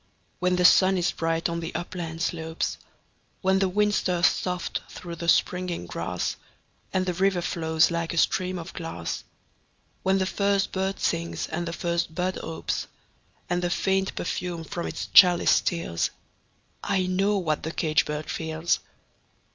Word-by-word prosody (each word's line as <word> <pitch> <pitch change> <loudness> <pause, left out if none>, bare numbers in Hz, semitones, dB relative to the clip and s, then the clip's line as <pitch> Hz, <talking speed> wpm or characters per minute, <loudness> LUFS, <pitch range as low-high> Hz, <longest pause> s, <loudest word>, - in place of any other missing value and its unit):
When 180 0 +2
the 180 0 +2
sun 190 +1 +6
is 175 - +1
bright 165 0 0
on 170 0 -2
the 165 0 -6
upland 165 -2 -4
slopes; 160 -1 -2 0.6
When 190 0 +3
the 190 -1 +2
wind 210 +2 +2
stirs 180 -3 +2
soft 180 -1 0
through 170 -1 -8
the 170 +1 -1
springing 180 - +1
grass, 85 +1 -3 0.5
And 185 -1 +1
the 180 - 0
river 190 +1 +2
flows 160 -1 +2
like 170 -1 -1
a 170 - -4
stream 185 +2 +1
of 170 +2 -7
glass; 165 - -5 0.8
When 190 +1 +2
the 190 - +1
first 200 +1 +1
bird 190 +1 -1
sings 170 0 -1
and 170 +2 -3
the 165 - -3
first 170 -2 -1
bud 185 +1 -1
opes, 165 - -3 0.6
And 175 0 0
the 175 - 0
faint 190 +1 0
perfume 175 -1 -3
from 170 +2 -4
its - - -4
chalice 180 -2 +7
steals 125 - +1 0.7
I 190 -2 +1
know 195 +3 +2
what 155 -5 0
the 160 - -3
caged 155 -2 +1
bird 150 0 -4
feels! 160 +1 -1
175 Hz, 160 wpm, -26 LUFS, 165-185 Hz, 0.8 s, chalice